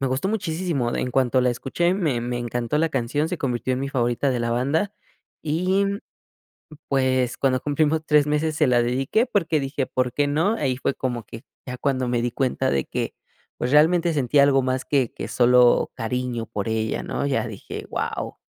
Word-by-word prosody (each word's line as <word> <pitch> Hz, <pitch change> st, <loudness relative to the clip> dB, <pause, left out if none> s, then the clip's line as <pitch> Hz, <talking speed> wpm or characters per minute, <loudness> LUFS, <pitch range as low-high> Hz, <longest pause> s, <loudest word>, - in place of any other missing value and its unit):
me 135 Hz, -, 0 dB
gustó 130 Hz, +9 st, -1 dB
muchisísimo. 170 Hz, -, -1 dB
En 125 Hz, -, -2 dB
cuanto 130 Hz, 0 st, +2 dB
la 125 Hz, 0 st, +2 dB
escuché, 170 Hz, +9 st, 0 dB
me 150 Hz, -11 st, 0 dB
me 120 Hz, +1 st, -3 dB
encantó 120 Hz, +3 st, -2 dB
la 165 Hz, +1 st, +2 dB
canción, 135 Hz, +3 st, -1 dB
se 180 Hz, -1 st, -3 dB
convirtió 125 Hz, -2 st, -1 dB
en 130 Hz, -, -3 dB
mi 140 Hz, -, -2 dB
favorita 125 Hz, +1 st, 0 dB
de 125 Hz, -, -1 dB
la 115 Hz, 0 st, -1 dB
banda. 140 Hz, -, 0 dB, 0.5 s
Y, 185 Hz, +6 st, +1 dB
mm, 200 Hz, +1 st, -2 dB, 0.9 s
pues, 130 Hz, -2 st, +1 dB
cuando 130 Hz, -2 st, +1 dB
cumplimos 150 Hz, +2 st, +1 dB
3 150 Hz, -1 st, +4 dB
meses 150 Hz, +1 st, 0 dB
se 150 Hz, -4 st, +3 dB
la 120 Hz, -1 st, +4 dB
dedique, 135 Hz, -, +1 dB
porque 165 Hz, -9 st, +1 dB
dije: 135 Hz, 0 st, -2 dB
"¿Por 125 Hz, -1 st, -1 dB
qué 145 Hz, +1 st, +1 dB
no?" 160 Hz, +9 st, +1 dB
Ahí 130 Hz, -4 st, -1 dB
fue 135 Hz, -, -1 dB
como 120 Hz, -3 st, -3 dB
que, 115 Hz, -, -10 dB, 0.2 s
ya 125 Hz, 0 st, -6 dB
cuando 130 Hz, -1 st, 0 dB
me 120 Hz, -1 st, 0 dB
di 120 Hz, 0 st, -1 dB
cuenta 130 Hz, 0 st, 0 dB
de 70 Hz, -1 st, 0 dB
que, -, -, -3 dB, 0.4 s
pues 125 Hz, +2 st, -2 dB
realmente 165 Hz, +3 st, +4 dB
sentía 140 Hz, 0 st, +3 dB
algo 135 Hz, -1 st, +4 dB
más 130 Hz, 0 st, -1 dB
que 135 Hz, -5 st, +1 dB
que -, -, -6 dB
solo 125 Hz, 0 st, +4 dB
cariño 120 Hz, 0 st, -3 dB
por 105 Hz, +2 st, -4 dB
ella, 110 Hz, 0 st, -1 dB
¿no? -, -, -3 dB
Ya 135 Hz, -3 st, 0 dB
dije: 105 Hz, -3 st, -8 dB
"wao". -, -, -4 dB
135 Hz, 200 wpm, -23 LUFS, 125-150 Hz, 0.9 s, 3